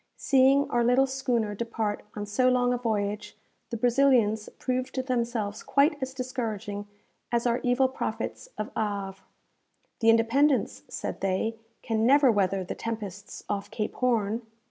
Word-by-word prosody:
Seeing 275 Hz, +1 st, +4 dB
our 240 Hz, 0 st, +2 dB
little 250 Hz, +3 st, +4 dB
schooner 250 Hz, -5 st, -1 dB
depart 220 Hz, -1 st, -3 dB
on 205 Hz, -1 st, -4 dB
so 250 Hz, +5 st, +2 dB
long 250 Hz, -1 st, +2 dB
a -, -, 0 dB
voyage, 210 Hz, -2 st, -2 dB, 0.3 s
the 235 Hz, -, -3 dB
Brazilians 240 Hz, -3 st, +3 dB
proved 255 Hz, 0 st, -2 dB
themselves 235 Hz, -5 st, -1 dB
quite 285 Hz, +1 st, +2 dB
as 260 Hz, 0 st, -4 dB
discouraging 225 Hz, -5 st, -4 dB, 0.4 s
as 235 Hz, 0 st, +1 dB
our 240 Hz, 0 st, +2 dB
evil 250 Hz, +2 st, +3 dB
prophets 265 Hz, -, -4 dB
of 215 Hz, -, -4 dB
Havre. 200 Hz, -3 st, -3 dB, 0.8 s
"The 225 Hz, -, +4 dB
'Independence,'" 245 Hz, +5 st, +3 dB
said -, -, -5 dB
they, 195 Hz, +4 st, -1 dB, 0.2 s
"can 220 Hz, -1 st, 0 dB
never 275 Hz, -1 st, +6 dB
weather 195 Hz, -2 st, +1 dB
the 180 Hz, -, -5 dB
tempests 205 Hz, -4 st, -6 dB
off 205 Hz, 0 st, -3 dB
Cape 215 Hz, -1 st, -3 dB
Horn!" 230 Hz, -3 st, 0 dB
230 Hz, 145 wpm, -27 LUFS, 210-255 Hz, 0.8 s, never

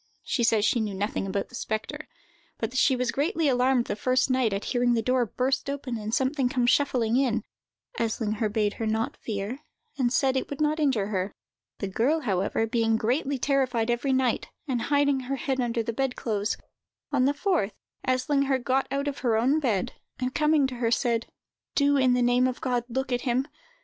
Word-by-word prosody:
She 240 Hz, -, -1 dB
says 220 Hz, -2 st, +3 dB
she 235 Hz, -, +2 dB
knew 210 Hz, -3 st, -2 dB
nothing 200 Hz, 0 st, -2 dB
about 195 Hz, +1 st, -2 dB
the -, -, -21 dB
spectre, 220 Hz, -3 st, -4 dB, 0.5 s
but 225 Hz, -, -3 dB
that 255 Hz, -, -4 dB
she 265 Hz, -, +4 dB
was 250 Hz, -1 st, 0 dB
greatly 320 Hz, +2 st, 0 dB
alarmed 250 Hz, -1 st, +3 dB
the 205 Hz, -, -2 dB
first 255 Hz, +4 st, +1 dB
night 255 Hz, -4 st, +2 dB
at 195 Hz, +1 st, -2 dB
hearing 245 Hz, -1 st, +2 dB
the 225 Hz, -, +1 dB
door 250 Hz, 0 st, +2 dB
burst 260 Hz, +6 st, -1 dB
open 280 Hz, -3 st, -3 dB
and 210 Hz, 0 st, -4 dB
something 265 Hz, +1 st, +1 dB
come 250 Hz, -2 st, +1 dB
shuffling 245 Hz, -3 st, +2 dB
in. 235 Hz, -5 st, +1 dB, 0.6 s
Eslinger 220 Hz, -1 st, -1 dB
bade 210 Hz, -1 st, +1 dB
her 225 Hz, -, 0 dB
not 220 Hz, +1 st, -1 dB
fear, 210 Hz, +4 st, -4 dB, 0.4 s
and 245 Hz, -2 st, +2 dB
said 265 Hz, 0 st, +2 dB
that 265 Hz, -, +2 dB
it -, -, -8 dB
would 285 Hz, -, -6 dB
not 305 Hz, +1 st, +1 dB
injure 255 Hz, -9 st, +1 dB
her. 190 Hz, -1 st, -2 dB, 0.4 s
The 200 Hz, -, -3 dB
girl, 255 Hz, +11 st, +1 dB
however, 200 Hz, -1 st, 0 dB
being 225 Hz, -1 st, +1 dB
greatly 265 Hz, +5 st, 0 dB
terrified 255 Hz, -4 st, +1 dB
every 240 Hz, +3 st, 0 dB
night, 260 Hz, -3 st, +1 dB, 0.2 s
and 250 Hz, -4 st, -1 dB
hiding 285 Hz, -1 st, +3 dB
her 260 Hz, +1 st, -3 dB
head 265 Hz, -1 st, -1 dB
under 235 Hz, -1 st, 0 dB
the 230 Hz, -, -3 dB
bed 265 Hz, +1 st, -1 dB
clothes, 210 Hz, -2 st, -1 dB, 0.5 s
on 265 Hz, -3 st, +3 dB
the 280 Hz, -, +3 dB
fourth 300 Hz, -, 0 dB, 0.3 s
Eslinger 270 Hz, +1 st, +2 dB
got 260 Hz, +1 st, 0 dB
out 280 Hz, +1 st, -2 dB
of 285 Hz, -, -3 dB
her 230 Hz, -4 st, +1 dB
own 265 Hz, +7 st, +3 dB
bed, 225 Hz, -10 st, 0 dB, 0.3 s
and, 255 Hz, 0 st, -2 dB
coming 300 Hz, -1 st, +3 dB
to 260 Hz, -1 st, -3 dB
her, 235 Hz, -1 st, +1 dB
said: 230 Hz, 0 st, +1 dB, 0.5 s
"Do, 285 Hz, 0 st, +4 dB
in 260 Hz, -2 st, +4 dB
the 250 Hz, 0 st, +2 dB
name 245 Hz, +1 st, +3 dB
of 255 Hz, -, -3 dB
God, 245 Hz, -2 st, -1 dB
look 260 Hz, +2 st, -2 dB
at 245 Hz, 0 st, 0 dB
him! 260 Hz, +1 st, 0 dB
250 Hz, 205 wpm, -27 LUFS, 225-270 Hz, 0.6 s, she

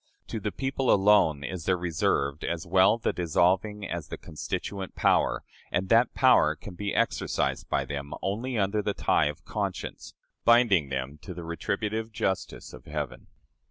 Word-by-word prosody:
To 110 Hz, -, -3 dB
the 105 Hz, 0 st, -3 dB
people 135 Hz, +1 st, 0 dB
alone 95 Hz, -8 st, +4 dB
is 85 Hz, +2 st, -5 dB
there 95 Hz, -1 st, +2 dB
reserved 75 Hz, -4 st, 0 dB
as 85 Hz, -1 st, -3 dB
well 95 Hz, +5 st, +4 dB
the 115 Hz, -, -1 dB
dissolving 95 Hz, +5 st, +1 dB
as 85 Hz, -3 st, -4 dB
the -, -, -6 dB
constituent 95 Hz, +5 st, -5 dB
power, -, -, +2 dB, 0.3 s
and 95 Hz, +2 st, -1 dB
that 115 Hz, +2 st, +4 dB
power 125 Hz, -, +5 dB
can 95 Hz, -, -10 dB
be 100 Hz, +3 st, -3 dB
exercised -, -, 0 dB
by -, -, 0 dB
them 70 Hz, 0 st, -5 dB
only 115 Hz, +6 st, -2 dB
under 100 Hz, +1 st, +1 dB
the 105 Hz, 0 st, -2 dB
tie -, -, +2 dB
of 75 Hz, 0 st, -6 dB
conscience, -, -, -4 dB, 0.3 s
binding 115 Hz, -, +5 dB
them 65 Hz, +2 st, -4 dB
to 90 Hz, -, -8 dB
the 85 Hz, -, -7 dB
retributive 105 Hz, +7 st, -3 dB
justice 95 Hz, -3 st, -3 dB
of 65 Hz, -1 st, -12 dB
Heaven. 75 Hz, -3 st, -5 dB
95 Hz, 160 wpm, -27 LUFS, 80-105 Hz, 0.3 s, power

